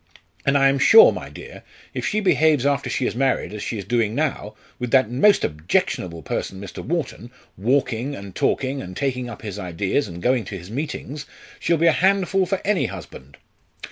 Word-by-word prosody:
And 140 Hz, +1 st, +4 dB
I 135 Hz, 0 st, +5 dB
am 135 Hz, 0 st, +1 dB
sure, 455 Hz, -, +8 dB
my -, -, -7 dB
dear, -, -, -11 dB, 0.3 s
if -, -, -3 dB
she 215 Hz, -, 0 dB
behaves 155 Hz, -8 st, +3 dB
after 140 Hz, -3 st, +1 dB
she 125 Hz, +1 st, -1 dB
is -, -, -1 dB
married 130 Hz, -3 st, 0 dB
as 105 Hz, -, -6 dB
she 115 Hz, -, -3 dB
is 100 Hz, -, -6 dB
doing 115 Hz, 0 st, 0 dB
now, 135 Hz, -8 st, -2 dB, 0.2 s
with 125 Hz, -1 st, -3 dB
that 130 Hz, -3 st, +3 dB
most 200 Hz, +12 st, +4 dB
objectionable 80 Hz, +2 st, -1 dB
person 95 Hz, -, -4 dB
Mr. 100 Hz, -2 st, -8 dB
Wharton 145 Hz, -7 st, -3 dB, 0.3 s
walking, 125 Hz, +4 st, 0 dB
and 100 Hz, -1 st, -9 dB
talking, 135 Hz, +6 st, 0 dB
and 90 Hz, 0 st, -8 dB
taking 125 Hz, -3 st, -2 dB
up 115 Hz, -, -10 dB
his 105 Hz, -2 st, -6 dB
ideas, 95 Hz, +7 st, -1 dB
and 85 Hz, -2 st, -8 dB
going 125 Hz, +4 st, +1 dB
to 95 Hz, -, -6 dB
his 90 Hz, +3 st, -11 dB
meetings 145 Hz, +2 st, -5 dB, 0.3 s
she'll 170 Hz, -, +1 dB
be 165 Hz, -, +2 dB
a 165 Hz, -, +7 dB
handful 190 Hz, +1 st, +2 dB
for 195 Hz, +1 st, -1 dB
any 205 Hz, -2 st, +1 dB
husband." 80 Hz, -7 st, -10 dB
125 Hz, 195 wpm, -22 LUFS, 100-150 Hz, 0.3 s, sure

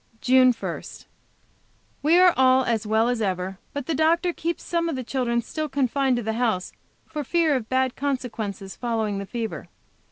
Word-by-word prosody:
JUNE 255 Hz, +1 st, +5 dB
1. 230 Hz, -, -5 dB, 1.2 s
We 320 Hz, +4 st, +4 dB
are 365 Hz, -1 st, +6 dB
all 260 Hz, 0 st, +5 dB
as 225 Hz, -2 st, -1 dB
well 220 Hz, +2 st, +3 dB
as 245 Hz, -2 st, 0 dB
ever, 190 Hz, -1 st, -2 dB
but 285 Hz, -2 st, -5 dB
the 325 Hz, -, -1 dB
doctor 335 Hz, +4 st, +2 dB
keeps 335 Hz, +1 st, -3 dB
some 335 Hz, -1 st, -1 dB
of 325 Hz, -, -2 dB
the 255 Hz, -, -4 dB
children 235 Hz, -2 st, -1 dB
still 310 Hz, +4 st, -4 dB
confined 270 Hz, -1 st, +1 dB
to 240 Hz, -, -2 dB
the 220 Hz, +1 st, -1 dB
house 220 Hz, -6 st, -1 dB, 0.3 s
for 300 Hz, -2 st, -5 dB
fear 320 Hz, +1 st, +2 dB
of 230 Hz, -4 st, -3 dB
bad 260 Hz, -1 st, +1 dB
consequences 230 Hz, -8 st, -4 dB
following 220 Hz, -4 st, -2 dB
the 200 Hz, -, -6 dB
fever. 230 Hz, -1 st, -5 dB
255 Hz, 180 wpm, -24 LUFS, 225-285 Hz, 1.2 s, are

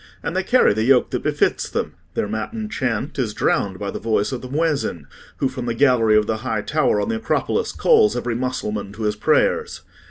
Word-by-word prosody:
And 170 Hz, -, -3 dB
they 185 Hz, -, +2 dB
carry 245 Hz, -, +4 dB
the 110 Hz, -, -1 dB
yoke 125 Hz, +1 st, +3 dB
that -, -, -2 dB
befits -, -, 0 dB
them: -, -, -3 dB, 0.2 s
their -, -, 0 dB
matin 210 Hz, -, -4 dB
chant 130 Hz, -, -2 dB
is 110 Hz, -5 st, -1 dB
drowned 95 Hz, -2 st, 0 dB
by 100 Hz, +1 st, -4 dB
the -, -, -5 dB
voice 110 Hz, -1 st, 0 dB
of 130 Hz, -, -4 dB
the 130 Hz, -, -8 dB
muezzin, 145 Hz, -, -1 dB, 0.3 s
who, 135 Hz, -, +1 dB
from 130 Hz, -2 st, -5 dB
the 115 Hz, -, -1 dB
gallery 115 Hz, -5 st, +4 dB
of 105 Hz, -, +3 dB
the 110 Hz, +1 st, -1 dB
high 110 Hz, -2 st, -3 dB
tower 150 Hz, -8 st, +1 dB
on -, -, -1 dB
the 230 Hz, -, 0 dB
Acropolis, 225 Hz, -, -1 dB
calls 445 Hz, -3 st, +3 dB
every 120 Hz, -, -2 dB
Mussulman 115 Hz, -5 st, -3 dB
to 110 Hz, +1 st, -6 dB
his 105 Hz, 0 st, 0 dB
prayers. 455 Hz, -, +1 dB
125 Hz, 215 wpm, -21 LUFS, 105-155 Hz, 0.3 s, carry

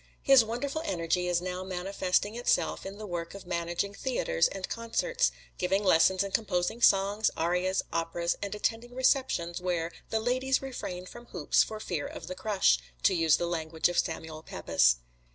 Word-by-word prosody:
His 270 Hz, -4 st, +7 dB
wonderful 275 Hz, +7 st, -3 dB
energy 180 Hz, -, 0 dB
is 175 Hz, -1 st, +1 dB
now 185 Hz, 0 st, -3 dB
manifesting 190 Hz, +2 st, -1 dB
itself 240 Hz, -4 st, 0 dB
in 195 Hz, +1 st, -8 dB
the 215 Hz, -, -7 dB
work 175 Hz, -2 st, -5 dB
of 200 Hz, -, -10 dB
managing 175 Hz, +3 st, -2 dB
theaters 200 Hz, -, +1 dB
and 195 Hz, -1 st, -5 dB
concerts, 485 Hz, -, 0 dB, 0.3 s
giving 190 Hz, +3 st, +1 dB
lessons 185 Hz, +1 st, +4 dB
and 200 Hz, -, -6 dB
composing 205 Hz, +1 st, 0 dB
songs, 200 Hz, +1 st, +4 dB
arias, 180 Hz, +3 st, +1 dB
operas, 170 Hz, +1 st, -1 dB
and 200 Hz, 0 st, -3 dB
attending 230 Hz, +3 st, -2 dB
receptions 255 Hz, -10 st, +1 dB
where 175 Hz, -2 st, -1 dB, 0.2 s
"the 220 Hz, -, 0 dB
ladies 255 Hz, +3 st, +1 dB
refrain 215 Hz, -9 st, -6 dB
from 240 Hz, +5 st, -12 dB
hoops -, -, +2 dB
for 215 Hz, -1 st, -2 dB
fear 170 Hz, -8 st, -3 dB
of 160 Hz, -, -8 dB
the 180 Hz, -, -5 dB
crush," 190 Hz, -, +2 dB, 0.2 s
to -, -, +5 dB
use 165 Hz, -3 st, +4 dB
the 175 Hz, -, -1 dB
language 160 Hz, -1 st, 0 dB
of 175 Hz, -, +1 dB
Samuel 160 Hz, -1 st, -3 dB
Pepys. 65 Hz, -, +2 dB
185 Hz, 170 wpm, -29 LUFS, 170-225 Hz, 0.3 s, His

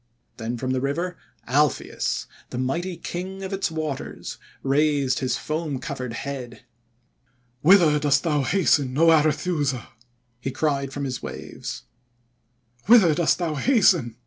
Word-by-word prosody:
Then 115 Hz, +1 st, -4 dB
from 130 Hz, +2 st, -2 dB
the 130 Hz, -1 st, 0 dB
river, 165 Hz, +6 st, -2 dB, 0.3 s
Alpheus, 145 Hz, +1 st, 0 dB, 0.2 s
the -, -, -6 dB
mighty 170 Hz, +8 st, -2 dB
King 185 Hz, +3 st, -6 dB
of 190 Hz, +1 st, -5 dB
its 195 Hz, -2 st, 0 dB
waters, 155 Hz, -4 st, -5 dB, 0.2 s
raised 140 Hz, -2 st, +2 dB
his 130 Hz, -2 st, -1 dB
foam 155 Hz, -2 st, -3 dB
covered 130 Hz, -2 st, -5 dB
head. 125 Hz, -2 st, -6 dB, 1.0 s
"'Whither 165 Hz, -3 st, +6 dB
dost 145 Hz, -1 st, +2 dB
thou 150 Hz, -4 st, +1 dB
hasten, 140 Hz, -5 st, +2 dB
0 165 Hz, +3 st, +5 dB
Arethusa?' 150 Hz, -3 st, +1 dB, 0.5 s
he 135 Hz, -, -3 dB
cried 140 Hz, 0 st, -1 dB
from 140 Hz, +1 st, -4 dB
his 130 Hz, -2 st, -3 dB
waves. -, -, -7 dB, 1.0 s
'Whither 210 Hz, -8 st, +7 dB
dost 155 Hz, -2 st, +2 dB
thou 170 Hz, -3 st, -1 dB
hasten?' 170 Hz, -, +3 dB
150 Hz, 130 wpm, -24 LUFS, 130-170 Hz, 1.0 s, Whither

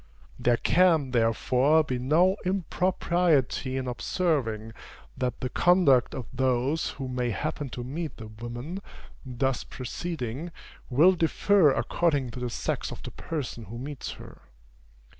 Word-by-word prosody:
There 120 Hz, -1 st, +3 dB
can, 165 Hz, -6 st, +3 dB
therefore, 125 Hz, +6 st, +3 dB
be 130 Hz, -4 st, -3 dB
no 165 Hz, +9 st, +3 dB
impropriety 175 Hz, -7 st, +1 dB
in 130 Hz, -1 st, -3 dB
observing, 120 Hz, -6 st, -1 dB, 0.4 s
that 125 Hz, -1 st, -3 dB
the 130 Hz, -, -2 dB
conduct 160 Hz, -7 st, +4 dB
of 130 Hz, -, -5 dB
those 130 Hz, +4 st, +1 dB
who 135 Hz, -2 st, -6 dB
may 125 Hz, -1 st, -1 dB
happen 145 Hz, +6 st, -3 dB
to 120 Hz, 0 st, -6 dB
meet 150 Hz, +4 st, -5 dB
the 115 Hz, -, -8 dB
women 120 Hz, -, -6 dB, 0.4 s
thus 130 Hz, 0 st, -1 dB
preceding, 140 Hz, +2 st, -5 dB, 0.4 s
will 150 Hz, +8 st, +6 dB
differ 175 Hz, 0 st, +3 dB
according 140 Hz, -2 st, 0 dB
to 125 Hz, -, -7 dB
the 125 Hz, -1 st, -2 dB
sex -, -, -3 dB
of -, -, -8 dB
the -, -, -7 dB
person 130 Hz, -8 st, -5 dB
who 115 Hz, +4 st, -8 dB
meets 140 Hz, +3 st, -6 dB
her. -, -, -13 dB
135 Hz, 135 wpm, -27 LUFS, 125-165 Hz, 0.4 s, will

